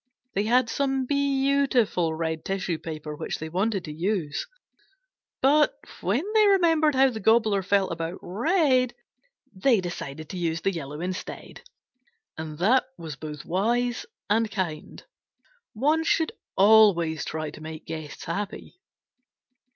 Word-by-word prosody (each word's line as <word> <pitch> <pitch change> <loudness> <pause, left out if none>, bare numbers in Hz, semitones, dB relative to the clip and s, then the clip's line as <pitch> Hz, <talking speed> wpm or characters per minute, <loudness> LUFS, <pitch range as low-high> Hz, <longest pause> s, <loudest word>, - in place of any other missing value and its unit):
They 200 +2 0
had 245 +2 +3
some 270 +1 0
beautiful 270 - +1
red 160 -1 -3
tissue 190 -4 -2
paper 155 -2 -6
which - - -4
they 160 - -6
wanted 195 +3 -1
to 150 - -6
use, 175 - -2 1.0
but 295 +3 +4 0.2
when 210 - +1
they 430 -1 +5
remembered 325 -6 +4
how 265 0 +5
the 220 - -5
Gobbler 220 -2 +3
felt 195 0 +1
about 165 +1 -4
red, 255 - +2 0.6
they 220 +4 +3
decided 160 -4 -6
to 185 - -5
use 165 -1 -1
the 195 - +1
yellow 150 -2 -6
instead. 185 +2 -6 0.7
And 155 -1 -6
that 240 - +3
was 160 -3 -7
both 150 0 -8
wise 235 - 0 0.2
and 220 +2 +2
kind. 175 -7 -5 0.7
One 300 +8 +2
should 320 0 +1 0.2
always 195 -7 +5
try 155 -1 -4
to 155 - -12
make 155 0 -8
guests 155 -2 -7
happy. 205 - -5
195 Hz, 135 wpm, -26 LUFS, 160-255 Hz, 1.0 s, they